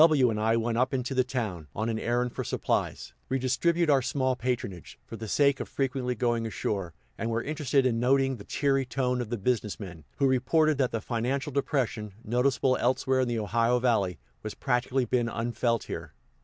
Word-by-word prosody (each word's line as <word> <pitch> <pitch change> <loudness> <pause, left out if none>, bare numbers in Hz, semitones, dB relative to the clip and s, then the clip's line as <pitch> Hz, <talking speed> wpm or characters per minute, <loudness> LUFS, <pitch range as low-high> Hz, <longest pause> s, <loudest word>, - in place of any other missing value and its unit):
W 145 -7 +5
and 105 - -2
I 110 +1 +3
went 115 0 0
up 130 +1 +1
into 130 +1 -2
the 130 -1 +3
town, 110 - -4
on 110 +2 -1
an 110 -1 -1
errand 120 +1 0
for - - -3
supplies, - - -2 0.2
we 135 - +1
distribute 165 +7 +1
our 140 -3 +4
small 130 0 0
patronage, 115 - -4
for - - -8
the 110 0 -6
sake 140 +4 +3
of - - -5
frequently 130 -2 -1
going 120 -1 0
ashore, 95 -5 -3 0.2
and 115 - -1
were 115 +1 -1
interested 145 -2 +1
in 115 -3 +2
noting 135 +1 +2
the 100 - -10
cheery 135 +2 +1
tone 125 0 -1
of 120 - -5
the 120 - -2
business 110 -1 -1
men, 90 -6 -8
who - - +2
reported 140 +4 +3
that 130 -2 +3
the 115 - -2
financial 130 +5 -2
depression, 125 -7 -1
noticeable 130 +2 +2
elsewhere 130 +1 +1
in 130 - +2
the 120 -1 -1
Ohio 115 +3 +2
Valley, 110 -8 +1 0.2
has 110 - -6
practically 125 0 0
been 120 0 +1
unfelt 115 0 -1
here. - - -7
125 Hz, 195 wpm, -28 LUFS, 115-135 Hz, 0.2 s, W